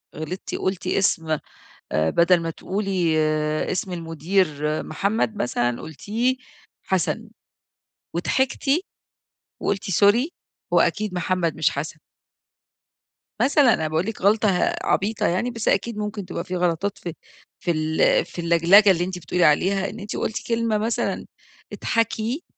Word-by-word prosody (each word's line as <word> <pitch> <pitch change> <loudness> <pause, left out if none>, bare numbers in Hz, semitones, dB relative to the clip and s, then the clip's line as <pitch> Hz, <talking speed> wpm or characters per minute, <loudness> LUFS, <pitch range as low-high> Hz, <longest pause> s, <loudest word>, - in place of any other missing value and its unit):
غلطتِ 155 +5 -5
قلتِ 185 -1 -2
اسم 160 -5 +1 0.6
آآ 80 +1 +2
بدل 175 +1 +4
ما 165 0 -3
تقولي 185 -3 -1 0.5
اسم 185 0 -2
المدير 170 +3 0 0.4
محمد 205 +6 -1
مثلًا، 120 -6 -1
قلتيه 225 - -1 0.5
حسن 190 +4 -1 0.9
وضحكتِ، 265 +1 0 0.9
وقلتِ 200 0 -2
سوري 210 - +4 0.4
هو - - +5
أكيد 210 -3 0
محمد 180 -2 0
مش 160 - +2
حسن. 155 +2 -5 1.4
مثلًا 280 -4 +5
أنا 160 - 0
باقول 160 +3 0
لِك 225 +1 -5
غلطة 210 +2 +4
ه 180 -2 +1
عبيطة 205 +2 +1
يعني 190 +8 0
بس 230 -2 -5
أكيد 220 +3 +1
ممكن 210 -1 -4
تبقى - - -4
في 185 - -5
غلطات 180 +3 0
في 170 - -6 0.5
في 175 - 0
ال 155 -1 +2
في 175 - -7
اللجلجة 170 +5 +6
اللي 175 -2 +1
أنتِ 185 0 -4
بتقولي 175 +2 0
عليها، 190 +6 +3
إن 220 - -9
أنتِ 205 0 -6
قلتِ 220 - -3
كلمة 230 -2 +1
مثلًا 225 +2 -1 0.5
إضحكي 230 - -1
190 Hz, 135 wpm, -23 LUFS, 170-215 Hz, 1.4 s, اللجلجة